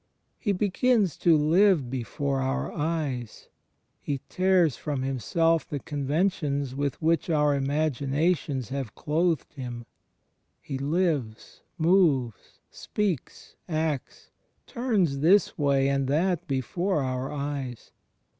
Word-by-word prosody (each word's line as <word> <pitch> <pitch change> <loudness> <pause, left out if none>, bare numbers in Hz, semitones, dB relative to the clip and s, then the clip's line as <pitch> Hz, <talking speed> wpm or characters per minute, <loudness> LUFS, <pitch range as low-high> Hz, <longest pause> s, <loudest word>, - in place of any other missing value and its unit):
He 205 - 0
begins 205 - +2
to 165 -2 +4
live 160 -3 +3
before 135 +2 -2
oxir 135 +1 -2
eyes; 145 -7 -3 0.5
He 140 -2 -3
tears 185 -6 +3
from 140 -3 -3
Himself 165 +5 +1
the 145 - -2
conventions 145 -1 -1
with 140 0 -2
which 165 +2 +1
our 150 -2 +3
imaginations 140 0 0
have 135 -5 -4
clothed 160 0 0
Him; 120 -4 -7 0.7
He 135 -2 -6
lives, 145 -7 -1 0.2
moves, 160 - +1
speaks, 200 - -4
acts, 155 -4 -3 0.3
turns 210 - 0
this 180 +6 +4
way 140 -2 +2
and 140 -1 0
that 175 +4 0
before 155 +5 -1
our 130 +1 -3
eyes. 140 -4 -5
145 Hz, 110 wpm, -27 LUFS, 135-170 Hz, 0.7 s, to